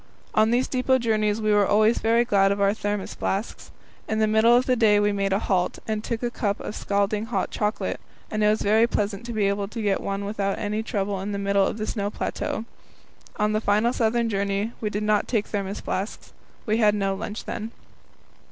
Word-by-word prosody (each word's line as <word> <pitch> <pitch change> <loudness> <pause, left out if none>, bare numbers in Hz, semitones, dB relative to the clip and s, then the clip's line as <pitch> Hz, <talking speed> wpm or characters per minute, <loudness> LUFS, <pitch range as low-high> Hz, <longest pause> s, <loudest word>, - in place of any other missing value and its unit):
On 215 +1 +4
these 245 +2 +2
depot 260 0 +2
journeys 215 -3 +1
we 215 -1 +1
were 205 -1 +4
always 215 +2 +3
very 230 +2 +3
glad 195 -3 +3
of 200 - -1
our 200 0 +3
Thermos 205 -2 -3
flasks. 200 +4 -3 0.4
In 220 - -1
the 220 - +3
middle 220 +2 +4
of 250 +1 +3
the 255 - +2
day 215 -3 +4
we 205 0 +2
made 200 -1 -1
a 195 - +3
halt, 185 -3 0
and 215 -1 -2
took 230 0 -3
a 240 - -1
cup 205 -3 -1
of 210 - -6
scalding 205 +2 -1
hot 235 - -2
chocolate, 210 +1 -2 0.3
and 215 0 0
it - - +5
was 215 - +1
very 220 +3 +4
pleasant 205 0 -2
to - - -4
be 215 -3 +1
able 200 0 -1
to 230 +3 -7
get 205 -3 0
one 200 0 -3
without 200 -1 -2
any 210 0 -2
trouble 200 -3 -2
in 205 +1 -4
the - - -2
middle 200 -1 +2
of - - -3
the 215 - -3
snow 205 -2 -2
plateau. 220 +1 -3 0.7
On 210 0 +1
the 215 0 0
final 215 +3 +2
southern 235 0 +1
journey 200 +1 -1
we 215 - -1
did 210 +1 -3
not 210 -1 +2
take 220 -4 0
Thermos 200 -1 -4
flasks. 195 +3 -4 0.3
We 215 0 +1
had 210 -2 +4
no 195 -1 0
lunch 210 +2 -6
then. 220 - -4
210 Hz, 220 wpm, -24 LUFS, 200-220 Hz, 0.7 s, it